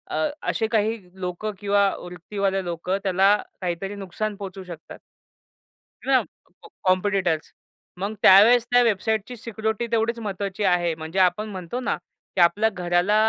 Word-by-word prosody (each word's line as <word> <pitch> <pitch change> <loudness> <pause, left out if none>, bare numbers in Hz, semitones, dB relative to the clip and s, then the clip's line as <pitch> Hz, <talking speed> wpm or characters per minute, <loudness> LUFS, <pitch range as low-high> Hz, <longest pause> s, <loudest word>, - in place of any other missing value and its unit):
अ, 155 0 +1 0.2
असे 220 - 0
काही 220 0 +1 0.2
लोकं 180 +4 -3
किंवा 200 -1 +3
वृत्तीवाल्या 190 +2 -2
लोकं 175 +2 -2
त्याला 195 +2 +4 0.3
काहीतरी 185 +3 -3
नुकसान 205 +2 -4
पोहोचू 195 -1 -7
शकतात. 170 -3 -10 1.1
है 270 - 0
ना, 260 - +6 0.4
कॉ 435 - -13 0.2
कॉम्पिटिटर्स 185 -4 +1 0.5
मग 200 +3 -2
त्यावेळेस 225 +5 +7
त्या 245 0 +6
वेबसाईटची 220 +1 0
सिक्युरिटी 220 +1 -3
तेवढीच 230 +1 +1
महत्त्वाची 200 -1 -4
आहे. 175 -3 +2
म्हणजे, 160 +4 -4
आपण 185 +4 +2
म्हणतो 185 +3 -5
ना, 255 - -1 0.4
की 185 - +3
आपल्या 200 +6 +4
घराला 180 +1 +1
195 Hz, 140 wpm, -24 LUFS, 180-215 Hz, 1.1 s, त्यावेळेस